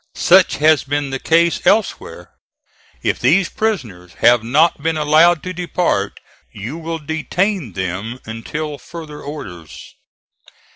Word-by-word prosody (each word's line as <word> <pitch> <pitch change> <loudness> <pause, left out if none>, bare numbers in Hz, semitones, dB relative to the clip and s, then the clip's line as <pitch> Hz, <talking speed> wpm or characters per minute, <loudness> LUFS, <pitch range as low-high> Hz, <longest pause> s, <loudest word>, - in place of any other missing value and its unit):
Such 185 +1 +4
has 155 -2 +4
been 145 0 -2
the 135 - -3
case 170 +3 +2
elsewhere. 215 +2 0 0.7
If - - 0
these 190 -2 +3
prisoners 110 - -3
have 120 0 +4
not 145 +7 +2
been 160 +1 -1
allowed 155 +2 +4
to 185 - -5
depart, 175 - -1 0.3
you 120 +11 -7
will 165 0 -4
detain 160 - -2
them 95 +6 -4
until 145 +7 -5
further 160 -3 -10
orders." 95 - -9
150 Hz, 125 wpm, -18 LUFS, 120-170 Hz, 0.7 s, Such